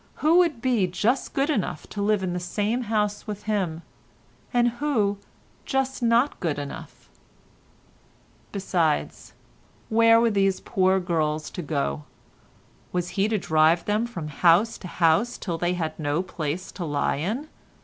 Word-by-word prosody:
Who 325 +3 +4
would 320 -10 +1
be 240 -8 +2
just 210 +9 0
good 280 +3 +2
enough 185 - -2
to 205 - -5
live 205 -1 +1
in 180 -1 -2
the 180 - -2
same 210 +7 -1
house 210 -1 -1
with 210 -1 -5
him, 185 -6 -2 0.7
and 240 0 +3
who 210 -9 +1 0.4
just 270 -1 -1
not 235 +4 +2
good 160 -6 -1
enough? 145 -1 -8 1.4
Besides, 175 -6 -1 0.6
where 230 0 +5
were 230 0 +3
these 195 -2 +2
poor 190 0 +2
girls 155 -4 -1
to 180 - -5
go? 140 - -2 0.9
Was 180 -1 -2
he 200 0 +1
to 220 0 0
drive 160 -1 +3
them 210 +3 0
from 170 -10 -6
house 175 +9 +3
to 185 - -8
house 170 +8 +2
till 170 -4 -4
they 175 +1 0
had 160 -2 -3
no 150 +3 0
place 170 -1 -4
to 180 - -6
lie 145 -2 0
in? 220 - -3
195 Hz, 150 wpm, -25 LUFS, 165-230 Hz, 1.4 s, where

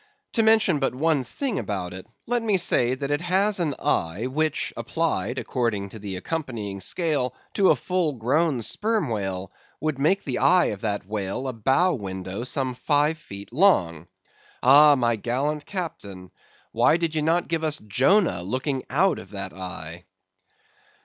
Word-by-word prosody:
To 225 - +3
mention 220 -7 +4
but 135 -2 -1
one 150 0 +1
thing 250 - -3
about 90 -4 -4
it, 95 +2 -9 0.2
let 240 0 0
me 215 -4 +2
say 130 -8 +3
that 140 +2 -4
it 145 +2 0
has 190 +3 +1
an 155 -6 0
eye 85 +8 -1
which 155 +4 -1
applied, 130 - -2
according 110 -8 -2
to 110 - -10
the 100 -2 -5
accompanying 110 - -4
scale, 140 - 0 0.2
to 195 -2 +3
a - - +6
full 180 -5 -1
grown 135 +2 0
sperm 210 - -1
whale, 95 -3 -3 0.3
would 155 -1 -2
make 185 +8 +2
the 130 -3 -2
eye 170 +7 +5
of 100 - -9
that 105 -3 -2
whale 105 +5 -3
a 130 - -3
bow 135 - +2
window 95 -2 -5
some 130 0 -2
five 150 +4 +1
feet 100 -6 -10
long. 90 - +2 0.6
Ah, 145 +3 +8
my 120 -3 +1
gallant 140 +7 -2
captain, 100 - -6 0.4
why 120 +8 +3
did 170 -2 -2
ye 155 - 0
not 165 +3 +1
give 165 -1 -1
us 155 -1 +1
Jonah 130 - +2
looking 130 - -2
out 175 +4 +2
of - - -12
that 95 -2 -6
eye! 90 -2 -7
130 Hz, 165 wpm, -24 LUFS, 100-165 Hz, 0.6 s, Ah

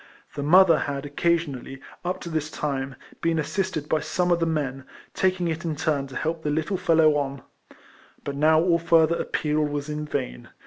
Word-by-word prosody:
The 145 - -4
mother 165 +1 +6
had 140 0 -3
occasionally, 145 -3 -1 0.2
up 180 +1 -2
to 170 - -6
this 155 -2 -2
time, 135 -3 -3 0.3
been 165 -1 +1
assisted 170 -1 -2
by 155 - +1
some 180 +3 -1
of 170 - +3
the 165 - +1
men, 140 -4 -2 0.3
taking 185 -2 +1
it 165 +1 -3
in 160 -2 -2
turn 145 -2 -1
to 135 - -11
help 160 +1 -2
the 150 - -2
little 160 +6 -1
fellow 160 -4 +4
on; 140 -2 -3 0.8
but 140 - -4
now 155 +2 +4
all 170 0 +3
further 165 0 +4
appeal 150 0 -1
was 145 0 -3
vain. 145 -5 -4
155 Hz, 180 wpm, -25 LUFS, 145-170 Hz, 0.8 s, mother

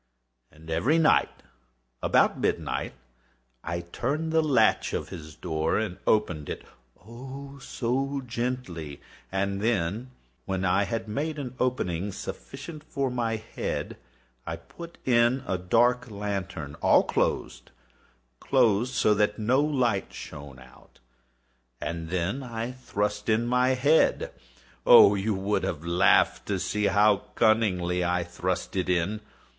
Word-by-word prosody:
And 80 +1 -12
every 125 - +2
night, 160 -2 +3 0.6
about - - +3
midnight, - - -1 0.7
I 85 +1 -3
turned 140 - -3
the 160 0 +4
latch 130 -8 +3
of - - -3
his 80 -1 -9
door 80 -2 -1
and 105 -5 -3
opened 90 -9 +1
it—oh, 130 - -10
so 135 +1 -2
gently! 115 - -4 0.3
And 100 +1 -1
then, 110 +2 0 0.4
when 95 -1 -2
I 95 +2 +3
had 115 0 -3
made 150 +8 -2
an 130 -4 -5
opening 100 -7 -1
sufficient 145 - -8
for 140 -4 -2
my 115 -2 -1
head, 110 - -4 0.5
I - - -2
put 170 0 -11
in 120 +1 +3
a 95 -2 -1
dark 120 +6 +2
lantern, 100 -7 -4
all - - +5
closed, - - -1 0.7
closed, 125 -1 +2
that 105 0 +3
no 120 +6 +2
light 125 -9 0
shone 70 -2 -9
out, 65 -1 -18 0.8
and 85 -1 -4
then 95 +9 -1
I 120 -1 -4
thrust 105 -4 -3
in 110 +2 +2
my 125 +2 +2
head. 145 +5 +3 0.5
Oh, 100 - +9
you 100 +1 0
would 100 +2 0
have 80 0 -3
laughed 85 +1 +3
to - - 0
see 105 0 -1
how 105 +1 +4 0.2
cunningly 90 -6 +2
I 90 0 +1
thrust 90 +2 -3
it 90 -1 -1
in! 90 +4 0
105 Hz, 130 wpm, -27 LUFS, 90-125 Hz, 0.8 s, Oh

